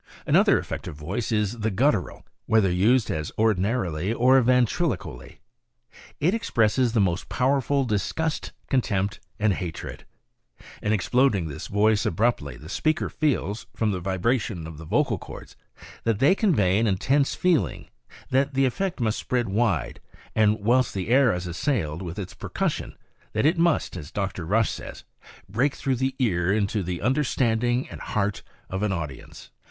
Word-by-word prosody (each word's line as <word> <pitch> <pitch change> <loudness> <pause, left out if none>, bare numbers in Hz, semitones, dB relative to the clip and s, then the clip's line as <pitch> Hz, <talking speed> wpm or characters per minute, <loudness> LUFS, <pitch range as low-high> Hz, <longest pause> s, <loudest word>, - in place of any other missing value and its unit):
Another - - +5
effective - - -5
voice 90 +11 -4
is 105 +1 0
the 110 +1 0
guttural, 110 - 0 0.2
whether 110 -4 +3
used 105 +6 +3
as 75 -1 -3
ordina 110 +2 +2
rily 90 0 -2
or 130 +3 +5
ventriloquially. 120 - 0 0.8
It 170 +6 +2
expresses 120 - +1
the 115 - +2
most 90 -3 0
powerful 135 +1 +1
disgust, 125 +9 -2 0.2
contempt 100 - 0 0.2
and 105 -1 +2
hatred. 90 -3 -6 0.8
In 105 - 0
exploding 110 -3 +2
this 70 - -7
voice 105 +1 +2
abruptly 90 - 0
the 75 - -12
speaker 155 - 0
feels, 125 -8 -1
from 110 -2 +1
the 95 - -2
vibration 95 0 -1
of 80 -2 -9
the 80 - -9
vocal - - +1
cords, - - -11 0.5
that 115 -2 +1
they 140 - +5
con 200 -4 +2
vey 95 -2 +3
an 115 - +2
intense 135 +9 +1
feeling, 160 - 0 0.4
that 135 +1 +1
the 135 0 +3
effect 180 +8 -2
must 110 -2 0
spread 120 -4 -1
wide, 100 - 0 0.4
and 110 -1 +3
whilst 120 +3 +2
the 95 +2 -3
air 130 +1 +5
i3 90 -1 -3
assailed 90 - -1
with 90 0 -6
its 95 -3 -5
percussion, - - -3 0.4
that 110 - +1
it 165 +3 +3
must, 170 - +2
as 80 -4 -7
Dr. 95 -4 -3
Rush 110 +4 +2
says, - - -8 0.3
" - - -18
break 125 +8 0
through 135 -2 -1
the 130 +2 -1
ear 90 -8 +1
into 105 0 0
the 90 -1 -4
understanding 125 -3 +1
and - - -10
heart 105 -1 -1 0.3
of 95 +1 -4
an 105 -1 +1
audience." 75 -8 -6
110 Hz, 160 wpm, -25 LUFS, 95-130 Hz, 0.8 s, Another